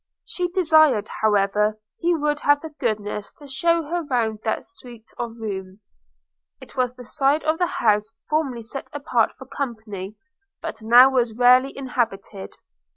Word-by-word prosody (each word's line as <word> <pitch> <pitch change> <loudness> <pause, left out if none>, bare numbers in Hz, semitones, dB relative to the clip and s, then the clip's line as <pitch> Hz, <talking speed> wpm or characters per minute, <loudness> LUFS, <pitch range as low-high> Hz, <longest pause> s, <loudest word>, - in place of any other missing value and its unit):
She 360 -1 -2
desired, 315 - +4
however, 210 0 +2 0.2
he 345 0 +2
would 295 -1 0
have 290 0 +3
the 320 - -8
goodness 210 -1 -2
to 290 - -14
shew 335 +5 +1
her 340 +4 -2
round 230 -6 -1
that 220 - -2
suit 240 -11 -14
of 235 -1 -4
rooms. 195 -2 -7 0.7
It - - -14
was 250 -1 0
the 250 - -11
side 275 +5 +1
of 315 +1 0
the 355 - +2
house 215 -5 +1
formerly 280 -7 -1
set 270 +5 -7
apart 290 +1 +1
for - - -11
company, 220 -7 -6 0.4
but - - -7
now 245 +4 +7
was 245 -3 +1
very - - -15
rarely 255 +2 +3
inhabited. 225 -7 -3
245 Hz, 155 wpm, -23 LUFS, 215-295 Hz, 0.7 s, now